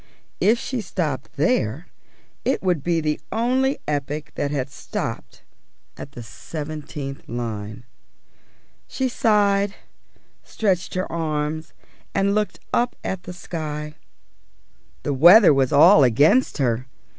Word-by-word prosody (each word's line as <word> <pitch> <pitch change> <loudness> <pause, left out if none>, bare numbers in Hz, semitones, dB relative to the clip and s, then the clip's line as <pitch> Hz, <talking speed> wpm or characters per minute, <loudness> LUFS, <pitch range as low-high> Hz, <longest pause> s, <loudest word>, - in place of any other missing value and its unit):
If 225 +3 +4
she 255 0 -3
stopped 155 -10 -3
there, 160 - 0 0.6
it 265 - 0
would 180 -5 +1
be 170 +1 0
the 150 -1 -1
only 260 +4 +1
epic 145 +1 -3
that 140 - -2
had 135 -2 -3
stopped - - -6 0.5
at 140 - -10
the 120 - -8
seventeenth 145 +2 -7
line. 110 -1 -5 1.0
She 265 - -1
sighed, 205 -4 +2 0.7
stretched 190 -5 -1
her 185 - 0
arms, 155 -1 -3 0.4
and 200 0 +2
looked 210 0 -1
up 240 +1 +1
at 190 -2 -3
the 180 - -7
sky. 150 -4 -5 1.1
The 145 - -1
weather 175 - +8
was 135 -2 +2
all 155 +2 +7
against 145 - +4
her. 125 -2 0
155 Hz, 120 wpm, -22 LUFS, 140-200 Hz, 1.1 s, weather